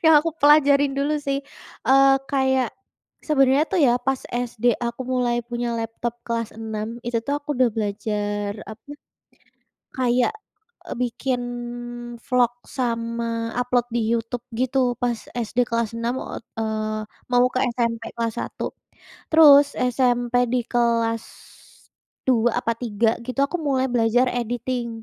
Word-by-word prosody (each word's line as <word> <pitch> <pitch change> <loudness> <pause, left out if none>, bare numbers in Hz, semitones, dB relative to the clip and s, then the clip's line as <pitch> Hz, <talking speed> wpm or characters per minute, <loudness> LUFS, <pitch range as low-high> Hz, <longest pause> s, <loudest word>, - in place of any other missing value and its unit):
yang 320 0 +7
aku 330 +2 -1
pelajarin 285 -1 +5
dulu 285 +2 +1
sih. 275 -1 -1 0.5
Eee, 270 0 +6
kayak, 265 -3 +2 0.5
sebenarnya 275 -1 +3
tuh 380 - +1
ya 240 - +4
pas 270 0 0
SD 240 -1 -4 0.2
aku 235 +2 -4
mulai 250 -2 +1
punya 240 0 -2
laptop 230 +1 -3
kelas 230 -1 -2
enam, 220 +1 -4
itu 240 -1 0
tuh 285 - 0
aku 290 - -31
udah 255 -1 +4
belajar 205 -1 -2 0.2
apa, 220 - -12 1.1
kayak, 250 - +2 0.5
eee, - - -6
bikin 250 +1 -1 0.9
vlog 250 -3 +3 0.2
sama 230 -2 -2
upload 245 -1 +1
di - - +2
YouTube 235 +1 -2
gitu, 255 +2 0 0.2
pas 240 -1 +1 0.2
SD 240 +1 0
kelas 230 -2 0
enam 235 +1 -1
ot - - -7 0.2
eee, 215 -1 -2 0.3
mau 245 0 +5
ke 255 - +1
SMP 230 -1 -1
kelas 230 -1 -1
satu. - - -5 0.7
Terus, 290 -3 +8
SMP 245 -1 +1 0.2
di 250 - +2
kelas, 230 -2 +1 1.1
dua 240 -2 +2
apa 230 - 0
tiga 225 -1 0
gitu, 255 +2 -4
aku 355 - -3
mulai 265 -1 +2
belajar 240 +2 +3
editing. 245 0 -2
240 Hz, 135 wpm, -23 LUFS, 230-260 Hz, 1.1 s, Terus